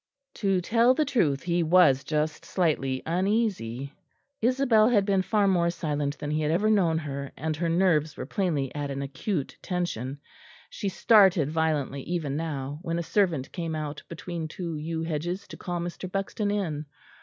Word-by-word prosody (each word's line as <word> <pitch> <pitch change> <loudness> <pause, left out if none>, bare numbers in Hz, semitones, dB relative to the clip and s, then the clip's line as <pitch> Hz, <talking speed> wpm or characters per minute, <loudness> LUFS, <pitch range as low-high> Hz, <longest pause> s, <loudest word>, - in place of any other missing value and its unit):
To 195 -3 +2
tell 235 +6 +4
the 305 - +2
truth, 165 - +1
he 175 0 +1
was 160 -5 +5
just 155 0 -1
slightly 140 -7 0
uneasy. 175 - -1 0.5
Isabel 240 -2 +4
had 205 -5 +3
been 195 -2 +2
far 205 +2 +2
more 175 -3 +3
silent 150 -4 -2
than 145 0 -4
he 155 +1 0
had 150 - 0
ever 200 +7 +2
known 175 -6 +3
her, 140 -3 -4
and 155 +2 -2
her 170 +1 0
nerves 165 -4 +2
were - - -4
plainly 150 -6 -1
at 145 -1 -3
an 140 0 -3
acute 140 +3 -3
tension; 145 -7 -3 0.5
she 200 - -3
started 190 -7 +5
violently 155 -4 0
even 155 -3 -2
now, 145 -2 -3
when 170 -2 -2
a 170 - -1
servant 165 -8 +1
came 165 -3 -3
out 150 -1 -4
between 170 -1 -5
two 170 0 -5
yew 160 +2 -3
hedges 175 +5 -3
to - - -8
call 175 -1 -4
Mr. 175 +2 -5
Buxton 195 +2 -2
in. 160 -8 -2
165 Hz, 170 wpm, -27 LUFS, 150-190 Hz, 0.5 s, was